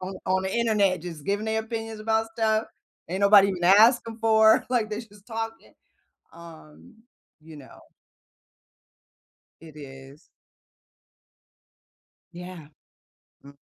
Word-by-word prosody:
On 185 +1 -7
on 190 0 0
the 190 - -3
internet 205 -7 +1
just 165 -5 -9
giving 205 +2 -2
their 220 0 -1
opinions 225 -1 -7
about 220 +1 -1
stuff, 220 -1 -1 0.4
ain't 185 +2 -4
nobody 200 0 +6
even 180 -3 -4
asking 225 +4 +4
for, 220 -1 +4
like, 235 -4 0
they 215 0 -5
just 210 -3 -17
talking. 225 -1 -7 0.6
Um, 165 +5 -15 0.5
you 160 0 -14
know 140 -3 -15 1.8
It 160 -2 -15
is. 135 +1 -13 2.0
Yeah. 175 -3 -11 0.8
Mhm. 140 0 -15
200 Hz, 115 wpm, -25 LUFS, 170-220 Hz, 2.0 s, nobody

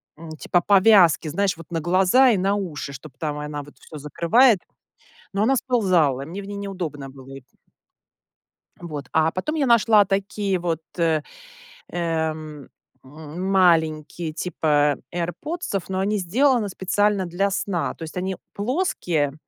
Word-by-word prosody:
м, 160 +1 -11
типа 175 - +1
повязки, 190 -4 +5
знаешь, 190 +2 0
вот 165 0 -13
на 165 -2 -2
глаза 190 - +4
и 215 - +3
на 195 +2 +1
уши, 165 -8 -5
чтоб 140 +3 -10
там 150 -2 -3
она 150 0 -5
вот 145 - -15
всё 155 - -11
закрывает, 180 - +3 0.7
но 200 +2 0
она 270 +4 +3
сползала, 180 - +1
мне 180 +7 -7
в 195 - -10
ней 200 0 -6
неудобно 175 -9 -5
было 135 0 -12
эти 125 - -16 1.3
Вот, 150 -6 -7
а 160 0 +3
потом 185 - -3
я 295 -3 +1
нашла 225 -3 +5
такие 195 0 -1
вот, 165 -2 -2 0.2
э, 165 -3 +2 0.7
эм, 160 -4 -3 0.3
м, 155 +6 -7
маленькие, 160 -3 +2
типа 150 -4 +1
"Айрподсов", 195 - -4
но 190 0 -2
они 205 +2 0
сделаны 230 +4 +2
специально 200 +1 0
для 180 +3 0
сна. 190 -2 -2
То - - -9
есть 160 - -8
они 185 +1 -2 0.2
плоские, 200 - -1
175 Hz, 150 wpm, -23 LUFS, 155-200 Hz, 1.3 s, повязки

